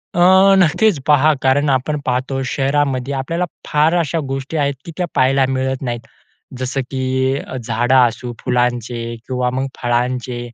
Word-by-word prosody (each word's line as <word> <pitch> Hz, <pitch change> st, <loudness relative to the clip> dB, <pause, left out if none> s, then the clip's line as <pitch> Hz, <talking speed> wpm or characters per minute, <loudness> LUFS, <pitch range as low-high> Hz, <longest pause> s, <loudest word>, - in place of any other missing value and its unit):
अ, 175 Hz, -, 0 dB, 0.4 s
नक्कीच 185 Hz, 0 st, +3 dB
पहा 150 Hz, +1 st, +5 dB
कारण 140 Hz, +2 st, +3 dB
आपण 135 Hz, +3 st, 0 dB
पाहतो 135 Hz, +2 st, -1 dB
शहरामध्ये 135 Hz, -1 st, 0 dB
आपल्याला 165 Hz, +7 st, -2 dB, 0.2 s
फार 150 Hz, +3 st, +2 dB
अशा 165 Hz, 0 st, -1 dB
गोष्टी 135 Hz, +4 st, -4 dB
आहेत, 140 Hz, -1 st, +1 dB
की 170 Hz, -, -7 dB
त्या 180 Hz, -, 0 dB
पाहायला 135 Hz, +1 st, +3 dB
मिळत 130 Hz, 0 st, -1 dB
नाहीत, 120 Hz, -2 st, -3 dB, 0.6 s
जसं 130 Hz, +1 st, -2 dB
की 130 Hz, +1 st, 0 dB, 0.2 s
झाडं 120 Hz, +3 st, +1 dB
असू 120 Hz, -1 st, +2 dB
फुलांचे 120 Hz, -1 st, -1 dB
किंवा 125 Hz, -1 st, -1 dB
मग 130 Hz, +1 st, -1 dB, 0.2 s
फळांचे 120 Hz, +1 st, -1 dB
130 Hz, 140 wpm, -18 LUFS, 125-145 Hz, 0.6 s, पहा